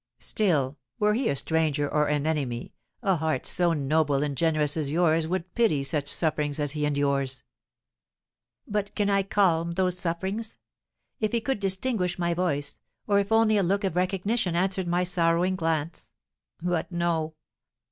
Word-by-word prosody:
"Still, 150 -10 0 0.2
were 210 0 +2
he 235 +1 +1
a - - +1
stranger 155 -1 +1
or 150 +1 +1
an 150 0 0
enemy, 135 -7 -2 0.3
a 190 -3 +2
heart 155 -4 -1
so 175 -2 +2
noble 145 -1 +1
and 145 -2 -2
generous 155 0 +1
as 155 -3 -1
yours 160 0 +2
would 180 0 -3
pity 215 -13 +2
such 145 0 -1
sufferings 150 -1 0
as 145 -1 0
he 150 -1 -1
endures?" 140 -2 0 1.2
"But 205 -1 -2
can 205 -1 +1
I 195 0 +3
calm 170 -4 +1
those 180 0 0
sufferings? 190 +6 -3 0.6
If 215 +1 -1
he 235 - +3
could 255 0 -2
distinguish 190 -1 -1
my 170 -1 0
voice, 145 -5 -1 0.3
or 200 -1 +3
if 200 +1 -2
only 225 -1 +4
a - - +3
look 195 +3 +1
of 190 -4 -1
recognition 185 +1 0
answered 190 +1 0
my 175 +1 +1
sorrowing 175 +1 +1
glance! 160 -2 -2 0.5
But 175 0 -2
no. 165 -2 -1
170 Hz, 160 wpm, -26 LUFS, 150-190 Hz, 1.2 s, only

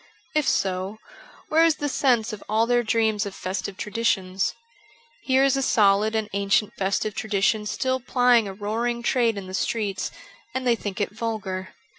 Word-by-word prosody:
If 305 -2 +1
so, 190 +2 -1 0.5
where 320 +1 +5
is 330 -2 +4
the 290 - -3
sense 245 -5 +1
of 210 - -8
all 220 +2 +3
their 240 0 +3
dreams 220 -3 +1
of 195 - -8
festive 190 +1 -4
traditions? 195 -4 -1 0.7
Here 265 0 +3
is 275 -1 +3
a 270 - 0
solid 215 -2 +3
and 220 -1 0
ancient 200 +1 +1
festive 200 +2 -1
tradition 210 0 0
still 260 +4 -1
plying 245 -3 +3
a 195 - -5
roaring 230 +4 -2
trade 230 -3 +2
in 195 - -5
the 185 - -9
streets, 200 -1 -1 0.5
and 260 0 -2
they 240 -1 +4
think 205 -3 -5
it 205 - -1
vulgar. 210 -4 -4
220 Hz, 170 wpm, -24 LUFS, 200-240 Hz, 0.7 s, where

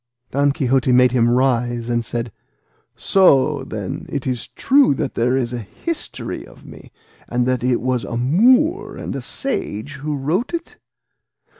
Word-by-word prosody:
Don 140 +1 +2
Quixote 135 -2 +1
made 125 0 +5
him 120 -2 +3
rise, 120 -2 +1
and 120 -1 0
said, 115 0 -4 0.6
"So, 145 -7 +3
then, 105 -7 -6
it 140 -2 -4
is 125 -3 -2
true 270 - +3
that - - -3
there 125 +3 +1
is 125 -2 -2
a 120 - -3
history 315 - -5
of - - -16
me, - - -13 0.4
and 120 0 0
that 130 -1 0
it 125 -1 +2
was 125 -1 -1
a 115 - -4
Moor 250 - +3
and - - -5
a - - -4
sage 145 - -4
who 150 +2 -3
wrote 175 - -1
it?" 340 0 -7
130 Hz, 160 wpm, -20 LUFS, 120-150 Hz, 0.6 s, made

